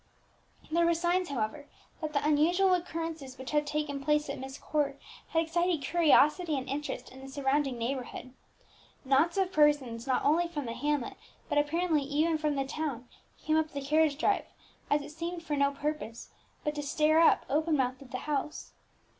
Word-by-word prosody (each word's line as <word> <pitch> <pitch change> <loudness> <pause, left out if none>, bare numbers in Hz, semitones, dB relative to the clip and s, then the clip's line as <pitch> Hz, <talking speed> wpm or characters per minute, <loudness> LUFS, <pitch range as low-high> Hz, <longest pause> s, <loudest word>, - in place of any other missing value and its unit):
There 335 +1 +3
were 340 - +3
signs, 350 +2 +1
however, 280 +3 -3 0.3
that 310 -1 -3
the 285 - 0
unusual 350 +6 +4
occurrences 325 -6 -3
which 260 0 -7
had 295 -1 +1
taken 295 -2 -2
place 300 +1 +1
at - - -6
Myst 265 +1 -7
Court 285 -2 -1 0.3
had 325 0 +1
excited 340 -1 0
curiosity 320 -1 +4
and 265 0 -4
interest 275 -2 -4
in 260 +1 -12
the 270 - -9
surrounding 270 -1 0
neighbourhood. 255 +1 -4 0.7
Knots 285 +7 +3
of 380 -1 +1
persons, 290 -7 +2
not 260 - +1
only 335 +4 +3
from 300 -5 -5
the 230 - -4
hamlet, 290 -2 -2 0.3
but 290 - +3
apparently 315 +1 +1
even 305 +3 +1
from 300 -1 0
the 275 -1 0
town, 270 -4 -4 0.4
came 310 0 +3
up 315 -1 +1
the 285 - -3
carriage 305 0 +3
drive, 400 +6 +1 0.4
as 290 0 +2
it 295 - -9
seemed 335 +2 -5
for 300 -3 -2
no 280 0 +3
purpose 285 -5 -4 0.3
but 300 - -1
to 295 - -3
stare 305 +2 +3
up, 330 - +5
open 310 +2 +1
mouthed, 260 0 -1
at 270 - -12
the 255 - -4
house. 295 0 -3
295 Hz, 180 wpm, -30 LUFS, 275-320 Hz, 0.7 s, up